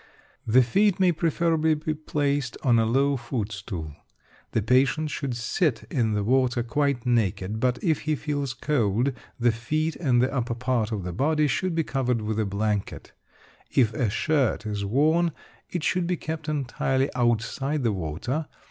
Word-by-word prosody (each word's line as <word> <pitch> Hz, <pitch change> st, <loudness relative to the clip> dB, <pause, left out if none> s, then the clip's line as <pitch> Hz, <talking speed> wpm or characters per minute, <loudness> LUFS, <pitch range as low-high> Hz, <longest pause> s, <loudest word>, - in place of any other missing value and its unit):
The 125 Hz, +3 st, +6 dB
feet 195 Hz, -, +2 dB
may 185 Hz, -2 st, +5 dB
preferably 160 Hz, -1 st, +1 dB
be 155 Hz, +1 st, -2 dB
placed 145 Hz, -4 st, -1 dB
on 120 Hz, -3 st, +4 dB
a 110 Hz, -, +2 dB
low 135 Hz, +4 st, +2 dB
foot 120 Hz, -3 st, -3 dB
stool. 90 Hz, -7 st, -6 dB, 0.6 s
The 110 Hz, -, 0 dB
patient 135 Hz, +6 st, +2 dB
should 135 Hz, -4 st, -3 dB
sit 120 Hz, -, 0 dB
in 115 Hz, -5 st, +1 dB
the 105 Hz, -1 st, 0 dB
water 130 Hz, +1 st, +2 dB
quite 135 Hz, +1 st, 0 dB
naked, 110 Hz, -3 st, 0 dB
but, 125 Hz, 0 st, +1 dB
if 160 Hz, -6 st, +2 dB
he 155 Hz, 0 st, -1 dB
feels 145 Hz, -3 st, -3 dB
cold, 120 Hz, -2 st, +1 dB, 0.3 s
the 120 Hz, 0 st, +4 dB
feet 155 Hz, +8 st, -2 dB
and 130 Hz, -7 st, +2 dB
the 130 Hz, +2 st, +1 dB
upper 120 Hz, -3 st, -1 dB
part 120 Hz, -2 st, -1 dB
of 105 Hz, -4 st, -3 dB
the 90 Hz, 0 st, -4 dB
body 150 Hz, -, +2 dB
should 170 Hz, +5 st, 0 dB
be 165 Hz, -, +2 dB
covered 125 Hz, -6 st, -1 dB
with 110 Hz, 0 st, -2 dB
a 110 Hz, -, +1 dB
blanket. 100 Hz, 0 st, -2 dB, 0.6 s
If 115 Hz, -5 st, +2 dB
a 115 Hz, -1 st, 0 dB
shirt 135 Hz, +1 st, +1 dB
is 105 Hz, -1 st, -3 dB
worn, 155 Hz, +10 st, +2 dB, 0.4 s
it 175 Hz, -4 st, -3 dB
should 180 Hz, -1 st, +1 dB
be 180 Hz, -1 st, 0 dB
kept 155 Hz, -1 st, -5 dB
entirely 135 Hz, -1 st, 0 dB
outside 125 Hz, +4 st, 0 dB
the 115 Hz, -3 st, +2 dB
water. 100 Hz, -, -3 dB
130 Hz, 170 wpm, -26 LUFS, 115-150 Hz, 0.6 s, The